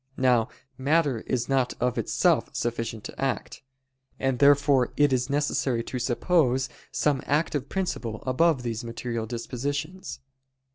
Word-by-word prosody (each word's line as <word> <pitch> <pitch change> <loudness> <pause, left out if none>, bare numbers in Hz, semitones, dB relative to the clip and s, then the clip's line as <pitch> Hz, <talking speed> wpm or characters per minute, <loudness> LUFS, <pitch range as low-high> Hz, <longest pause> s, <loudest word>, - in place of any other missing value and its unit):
Now 125 -3 +3 0.3
matter 145 -2 +2
is 120 -2 -1
not 130 -2 +1
of 125 0 +1
itself - - +1
sufficient 115 -2 -3
to - - -8
act. 135 -2 -2 0.6
And 135 -2 0
therefore 140 -2 +4
it 145 -2 +4
is 125 +1 0
necessary 140 -4 0
to 125 - -4
suppose 130 +1 +2 0.2
some 140 -1 +1
active 145 -2 0
principle 120 - -3
above 135 +1 +2
these 115 0 -3
material 115 -1 -4
dispositions. 140 - -4
130 Hz, 130 wpm, -26 LUFS, 120-145 Hz, 0.6 s, therefore